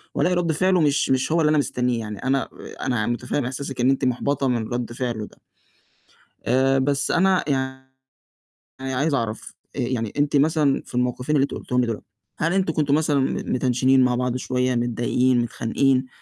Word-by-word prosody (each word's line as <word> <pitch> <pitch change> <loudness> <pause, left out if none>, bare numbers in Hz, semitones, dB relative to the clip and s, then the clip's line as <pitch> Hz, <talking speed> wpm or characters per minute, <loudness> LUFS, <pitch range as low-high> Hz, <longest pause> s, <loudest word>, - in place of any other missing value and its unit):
والاقي 180 0 +2
رَد 170 -2 +1
فعله 185 +2 +2
مش 145 -2 +2
مش 130 +3 +1
هو 165 0 +3
اللي 150 - +3
أنا 155 - +3
مستنيه، 125 -4 0
يعني 105 -2 -6
أنا 135 +1 0 0.3
أنا 120 -5 0
متفهِّم 120 +2 -2
إحساسِك 135 0 -4
إن 130 - +4
أنتِ 135 -1 +1
محبطة 135 +2 0
من 120 -3 0
رَد 120 -1 -3
فعله 120 -4 -3
ده، - - -20 1.1
آآ 135 +2 +3
بس 140 +1 0
أنا 190 +1 +3
يعني 130 -1 -2 1.1
عايز 145 +3 +1
أعرف 115 -4 -3 0.2
آآ - - -1
يعني 120 -3 -2
أنتِ 145 0 +2
مثلًا 150 -1 +2
في - - -14
الموقِفين 125 +4 0
اللي 135 - +3
أنتِ - - -4
قُلتيهم 125 0 -1
لي 125 - +1
دُول، 115 -2 -4 0.4
هل 165 +2 +1
أنتم 190 -4 +1
كنتم 145 -2 +1
مثلًا 150 -2 +2
م 130 - 0 0.2
متنشنين 130 +1 +3
مع 125 - +2
بعض 125 0 -1
شوية، 125 0 0
متضايقين 120 +1 +1
متخانقين؟ 130 +3 +1
130 Hz, 180 wpm, -23 LUFS, 125-145 Hz, 1.1 s, إن